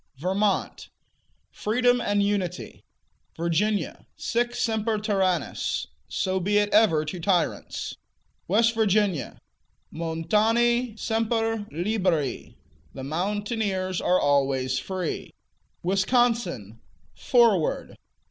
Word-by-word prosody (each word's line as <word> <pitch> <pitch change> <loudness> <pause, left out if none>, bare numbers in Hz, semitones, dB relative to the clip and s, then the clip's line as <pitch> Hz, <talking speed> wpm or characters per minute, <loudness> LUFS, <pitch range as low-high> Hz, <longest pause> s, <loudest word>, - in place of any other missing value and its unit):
Vermont 190 +6 -1 0.6
Freedom 245 +3 +1
and 205 -2 +1
Unity. 195 -3 -2 0.5
Virginia 180 +6 -1
Sic 240 +1 -1
semper 220 -1 0
tyrannis: 190 - 0 0.2
So 190 0 -1
be 205 +3 +1
it 205 0 +2
ever 180 -8 +4
to 175 +4 -5
tyrants. 175 -1 -1 0.5
West 225 +5 +3
Virginia 205 - +1 0.6
Montani 220 +9 +1
semper 225 -1 -1
liberi: 175 -4 -1 0.4
The 135 - -6
mountaineers 190 - -2
are 180 - +3
always 135 -2 +1
free. 185 -3 -4 0.5
Wisconsin 190 - +1 0.3
Forward. 230 -10 +2
200 Hz, 85 wpm, -25 LUFS, 170-225 Hz, 0.6 s, ever